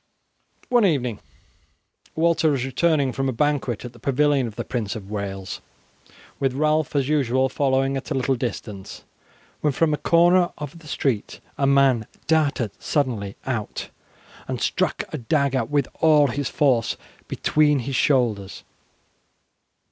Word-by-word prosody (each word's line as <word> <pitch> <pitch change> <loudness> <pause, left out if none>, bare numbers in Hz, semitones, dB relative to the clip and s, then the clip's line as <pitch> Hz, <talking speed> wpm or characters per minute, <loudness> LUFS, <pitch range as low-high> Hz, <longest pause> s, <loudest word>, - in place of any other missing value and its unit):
One 245 -3 +4
evening 125 - +1 1.0
Walter 165 -1 +3
was 135 -4 0
returning 140 0 +1
from 135 +1 -1
a - - +1
banquet 130 -3 -1
at 120 - -8
the 120 - -16
pavilion 140 +1 +2
of 110 - -9
the - - -4
Prince 115 -5 -3
of 100 -2 -8
Wales, 100 -2 -5 0.8
with 135 -2 0
Ralph 155 +1 +1
as 140 -2 +1
usual 130 -3 +2
following 135 0 +1
at 135 - -5
a 150 - -1
little 135 0 +1
distance, 110 -5 -5 0.6
when 150 -2 +1
from 155 +2 +2
a - - 0
corner 175 +2 +4
of 150 +3 -7
the 160 - -15
street 130 -7 -2 0.2
a 140 - +1
man 135 -5 +3 0.2
darted 145 -8 +1
suddenly 120 -9 -1
out 120 -5 -4 0.6
and - - -3
struck - - 0
a 155 - -3
dagger 135 -1 +1
with 145 +1 0
all 150 -3 +5
his 140 +2 -2
force 130 -6 +1 0.3
between 150 -3 +2
his 135 +2 -4
shoulders. 115 -9 +1
135 Hz, 145 wpm, -23 LUFS, 120-150 Hz, 1.0 s, all